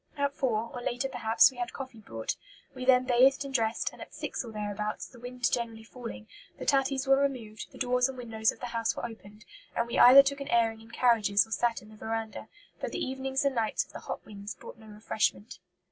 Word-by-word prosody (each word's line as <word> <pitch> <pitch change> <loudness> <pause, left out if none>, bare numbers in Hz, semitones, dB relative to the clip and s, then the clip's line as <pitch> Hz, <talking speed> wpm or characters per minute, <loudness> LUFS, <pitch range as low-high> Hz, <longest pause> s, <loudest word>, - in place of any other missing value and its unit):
At 280 0 0
four, 230 -5 -1
or 245 - -5
later 245 +2 -1
perhaps, 240 -2 +4
we 255 - -16
had 245 0 -3
coffee 260 -4 -8
brought. 115 - -4 0.4
We 255 -1 -6
then 255 -1 +6
bathed 260 +3 +4
and 275 - -7
dressed, 225 -2 0
and - - -13
at - - -10
six - - -4
or 235 - -8
thereabouts, 210 0 -3
the 245 - -15
wind 250 +1 -2
generally 230 -2 -2
falling, 230 -2 -9 0.3
the - - -6
tatties 270 -1 +2
were 270 0 +5
removed, 240 -6 -3
the - - -13
doors 250 0 +2
and 265 - -7
windows 225 -2 0
of - - -15
the - - -3
house 230 -1 0
were - - -4
opened, 210 -2 -11 0.3
and 235 - +1
we 235 - -2
either 260 +3 +10
took 280 0 -2
an 280 - -5
airing 225 -1 +2
in 225 - -15
carriages 225 -4 +3
or 220 - -20
sat 230 0 0
in 210 - -15
the 215 - -14
veranda; 225 0 -4 0.3
but - - -4
the - - -2
evenings 265 +1 -2
and 280 - +2
nights 225 -3 0
of - - -20
the - - -6
hot - - -6
winds 205 0 -8
brought - - -12
no 220 - -14
refreshment." 215 +1 -2
235 Hz, 230 wpm, -29 LUFS, 220-260 Hz, 0.4 s, either